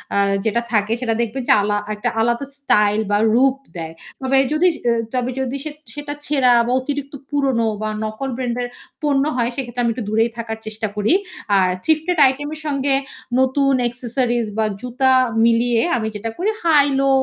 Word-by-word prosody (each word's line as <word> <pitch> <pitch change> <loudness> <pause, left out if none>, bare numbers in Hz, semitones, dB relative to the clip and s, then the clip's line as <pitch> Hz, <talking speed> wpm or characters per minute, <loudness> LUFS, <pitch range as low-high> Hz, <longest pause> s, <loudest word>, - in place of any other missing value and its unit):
আ - - +3 0.3
যেটা 230 +2 +1
থাকে 215 +1 +2
সেটা 230 -2 0
দেখবেন 240 +3 -3
যে - - +8
আলা 205 0 0 0.2
একটা 210 - -1
আলাদা 235 +4 0
স্টাইল 210 -5 +3
বা 205 - +4 0.2
রূপ 265 +1 +4 0.2
দেয়। 160 -1 -5 0.3
তবে 265 +1 +3
যদি 355 +4 +4 0.5
তবে 250 +1 -2
যদি 265 +1 -2
সে 305 - -5 0.2
সেটা 290 0 -5
ছেঁড়া 265 -4 +3
বা - - 0
অতিরিক্ত 280 +1 -4 0.2
পুরনো 265 -6 +1
বা 215 - -1
নকল 215 +5 -4
ব্র্যান্ডের 245 -1 -2 0.4
পণ্য 280 -2 +2
হয় 240 0 +1
সেক্ষেত্রে 245 -2 -3
আমি 235 - +2
একটু 235 -3 -5
দূরেই 225 +2 +2
থাকার 225 -1 -4
চেষ্টা 220 0 -3
করি। 210 - +2 0.5
আর 185 -1 +3
থ্রীফটেড 320 +2 +1
আইটেম 290 +3 -2
এর - - -8
সঙ্গে 275 -1 +1 0.5
নতুন 270 +1 +2
অ্যাক্সেসরিজ 240 -1 -1
বা 220 - +2 0.2
জুতা 255 +2 +1 0.3
মিলিয়ে 235 0 +3 0.2
আমি 220 -1 -2
যেটা 225 +2 -4
করি 390 +5 0
হাই 295 -4 +5
লো 275 0 +2
245 Hz, 175 wpm, -20 LUFS, 225-275 Hz, 0.5 s, যে